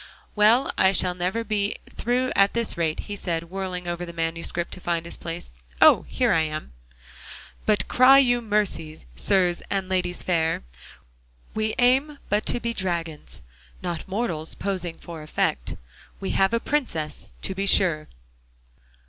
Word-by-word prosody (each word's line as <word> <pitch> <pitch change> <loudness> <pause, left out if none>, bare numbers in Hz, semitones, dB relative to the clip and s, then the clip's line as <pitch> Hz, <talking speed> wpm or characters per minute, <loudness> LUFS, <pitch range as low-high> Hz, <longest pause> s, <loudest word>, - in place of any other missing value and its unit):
"Well, 220 +5 +4
I 190 +1 +5
shall 180 -1 +3
never 180 +6 -2
be 210 -2 -1 0.2
through 250 +2 0
at 195 0 +4
this 235 -1 0
rate," 160 -2 -1
he 205 - -6
said, 170 -3 -3
whirling 185 -2 -4
over 175 0 -3
the 170 - -6
manuscript 165 +1 -2
to - - -8
find 170 -1 -1
his 170 - -3
place. 165 - -7 0.3
"Oh! - - +7
here - - +1
I 165 - +4
am: 155 - -4 0.9
"'But 215 -1 +2
cry 255 +2 +7
you 245 -3 +4
mercy, 205 - -1
Sirs 180 - +2
and 195 -1 -1
ladies 180 -1 -1
fair, 165 - 0 0.9
We 215 0 -1
aim 265 +4 +3
but 210 +1 +1
to 245 - +1
be 235 0 -2
dragons, 170 - -4 0.4
Not 175 -3 -4
mortals 190 -6 -2
posing 180 -4 -3
for 165 -2 -9
effect. 150 - -1 0.4
We 195 - -3
have 195 +1 +3
a - - +1
princess, 165 - -3
to 190 - -2
be 195 +1 -2
sure'"? 160 -6 +4
185 Hz, 155 wpm, -25 LUFS, 165-215 Hz, 0.9 s, Oh